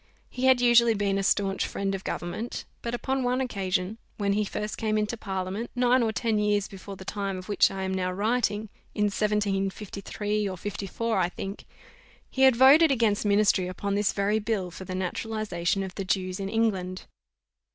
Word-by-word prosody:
He 250 Hz, +1 st, -2 dB
had 260 Hz, -1 st, +5 dB
usually 235 Hz, -1 st, +5 dB
been 200 Hz, -1 st, 0 dB
a -, -, 0 dB
staunch 195 Hz, -1 st, +1 dB
friend 195 Hz, 0 st, -2 dB
of 195 Hz, 0 st, -4 dB
government; 215 Hz, +7 st, -4 dB, 0.2 s
but 235 Hz, 0 st, -3 dB
upon 265 Hz, +2 st, -1 dB
one 250 Hz, 0 st, +1 dB
occasion, 195 Hz, -4 st, -2 dB, 0.2 s
when 200 Hz, -1 st, +1 dB
he 210 Hz, +1 st, +1 dB
first 210 Hz, +1 st, -4 dB
came 215 Hz, -1 st, 0 dB
into 210 Hz, +2 st, -1 dB
parliament, 195 Hz, +1 st, -4 dB
nine 250 Hz, +1 st, +3 dB
or 225 Hz, -2 st, +1 dB
ten 220 Hz, -1 st, 0 dB
years 210 Hz, -1 st, +1 dB
before 195 Hz, 0 st, -9 dB
the 190 Hz, -, -11 dB
time 200 Hz, -1 st, -3 dB
of 185 Hz, -, -9 dB
which 205 Hz, -, +4 dB
I 195 Hz, 0 st, -4 dB
am 190 Hz, 0 st, -2 dB
now 185 Hz, -1 st, -1 dB
writing, 210 Hz, +1 st, 0 dB, 0.3 s
in 210 Hz, -, +1 dB
1753 205 Hz, 0 st, -1 dB
or 185 Hz, -, -6 dB
54, 205 Hz, +3 st, -2 dB
I 175 Hz, -1 st, +2 dB
think, 195 Hz, +2 st, -7 dB, 0.7 s
he 265 Hz, -, -2 dB
had 265 Hz, -2 st, +7 dB
voted 280 Hz, +6 st, +7 dB
against 225 Hz, -6 st, +2 dB
ministry 200 Hz, -3 st, +3 dB
upon 200 Hz, +2 st, -3 dB
this 205 Hz, 0 st, +2 dB
very 205 Hz, +2 st, +1 dB
bill 205 Hz, -4 st, -2 dB
for 190 Hz, -, -9 dB
the 185 Hz, -, -5 dB
Naturalization 195 Hz, -1 st, -2 dB
of 190 Hz, -1 st, -6 dB
the 195 Hz, -, -4 dB
Jews 185 Hz, 0 st, -1 dB
in 195 Hz, 0 st, -3 dB
England. 195 Hz, -5 st, -1 dB
205 Hz, 185 wpm, -27 LUFS, 195-225 Hz, 0.7 s, had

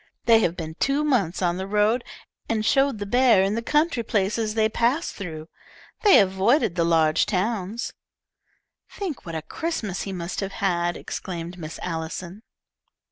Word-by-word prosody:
They 230 Hz, -1 st, +6 dB
have 175 Hz, -5 st, 0 dB
been 160 Hz, -2 st, -5 dB
two 280 Hz, +2 st, +1 dB
months 205 Hz, -, +1 dB
on 175 Hz, 0 st, +1 dB
the 190 Hz, +1 st, -4 dB
road, 210 Hz, +4 st, +2 dB, 0.5 s
and 220 Hz, -1 st, 0 dB
showed 270 Hz, +2 st, +3 dB
the 205 Hz, -, -4 dB
bear 240 Hz, -2 st, +4 dB
in 195 Hz, +1 st, +1 dB
the 230 Hz, -, -1 dB
country 300 Hz, +1 st, +1 dB
places 215 Hz, 0 st, -1 dB
they 220 Hz, -1 st, +3 dB
passed 240 Hz, +8 st, 0 dB
through. 160 Hz, -5 st, -7 dB, 0.5 s
They 410 Hz, -3 st, +7 dB
avoided 200 Hz, -, +2 dB
the 170 Hz, -1 st, +1 dB
large 160 Hz, -2 st, +3 dB
towns." 210 Hz, +3 st, -2 dB, 1.0 s
"Think 335 Hz, -, -6 dB
what 165 Hz, -, -5 dB
a 160 Hz, -, -4 dB
Christmas 230 Hz, -, -3 dB
he 195 Hz, -, -4 dB
must 175 Hz, -1 st, -4 dB
have 195 Hz, -1 st, -3 dB
had!" 175 Hz, -3 st, 0 dB
exclaimed 175 Hz, 0 st, -6 dB
Miss 160 Hz, -1 st, -7 dB
Allison. 170 Hz, +3 st, -5 dB
200 Hz, 160 wpm, -24 LUFS, 175-235 Hz, 1.0 s, They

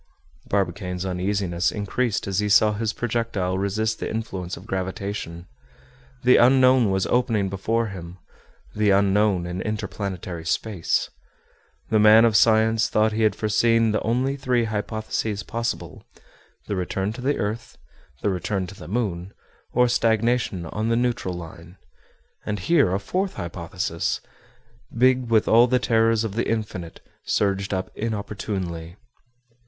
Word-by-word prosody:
Barbicane's 90 Hz, -1 st, -2 dB
uneasiness 90 Hz, -1 st, -1 dB
increased 110 Hz, +2 st, -1 dB
as 95 Hz, -1 st, -1 dB
he 105 Hz, 0 st, 0 dB
saw 105 Hz, +2 st, +5 dB
his 110 Hz, +1 st, -1 dB
projectile 110 Hz, -6 st, -2 dB
resist 110 Hz, +3 st, -1 dB
the -, -, -3 dB
influence 95 Hz, -5 st, -4 dB
of -, -, -12 dB
gravitation. 95 Hz, -2 st, -4 dB, 0.8 s
The 125 Hz, +1 st, +6 dB
Unknown 130 Hz, -2 st, +5 dB
was 95 Hz, 0 st, +1 dB
opening 115 Hz, -5 st, +1 dB
before 110 Hz, +4 st, -1 dB
him, 90 Hz, -2 st, -9 dB, 0.6 s
the 105 Hz, -1 st, +1 dB
Unknown 100 Hz, -1 st, +3 dB
in 90 Hz, +1 st, -4 dB
interplanetary 95 Hz, -5 st, -4 dB
space. 90 Hz, +1 st, -1 dB, 0.8 s
The 110 Hz, -, +4 dB
man 110 Hz, +2 st, +7 dB
of 115 Hz, -2 st, +2 dB
science 110 Hz, +1 st, +4 dB
thought 110 Hz, +1 st, +2 dB
he 110 Hz, +1 st, -2 dB
had 105 Hz, -2 st, +3 dB
foreseen 115 Hz, +1 st, +2 dB
the 105 Hz, -, 0 dB
only 130 Hz, +4 st, 0 dB
three 125 Hz, -3 st, 0 dB
hypotheses 110 Hz, -1 st, -3 dB
possible—the 115 Hz, -2 st, -7 dB
return 95 Hz, +2 st, -2 dB
to 125 Hz, -, -8 dB
the 140 Hz, +3 st, 0 dB
earth, 110 Hz, +3 st, -4 dB, 0.5 s
the 105 Hz, -, +2 dB
return 95 Hz, +1 st, -2 dB
to 90 Hz, -, -10 dB
the -, -, -11 dB
moon, 95 Hz, -3 st, -3 dB, 0.4 s
or 125 Hz, 0 st, +3 dB
stagnation 115 Hz, -5 st, +1 dB
on 105 Hz, +7 st, -3 dB
the 115 Hz, -, +2 dB
neutral 120 Hz, -6 st, -1 dB
line; 85 Hz, +1 st, -10 dB, 0.7 s
and 105 Hz, -, -3 dB
here 140 Hz, -, +3 dB
a 95 Hz, -, 0 dB
fourth 185 Hz, -, -2 dB
hypothesis, 85 Hz, 0 st, -3 dB, 0.8 s
big 130 Hz, 0 st, +3 dB
with 110 Hz, -2 st, +3 dB
all 120 Hz, +2 st, +6 dB
the 125 Hz, +1 st, +3 dB
terrors 115 Hz, -2 st, +2 dB
of 110 Hz, -3 st, -3 dB
the 115 Hz, -, -1 dB
Infinite, 105 Hz, -7 st, -4 dB, 0.2 s
surged 100 Hz, -1 st, 0 dB
up 95 Hz, -1 st, -2 dB
inopportunely. 100 Hz, -6 st, -4 dB
105 Hz, 135 wpm, -24 LUFS, 95-115 Hz, 0.8 s, man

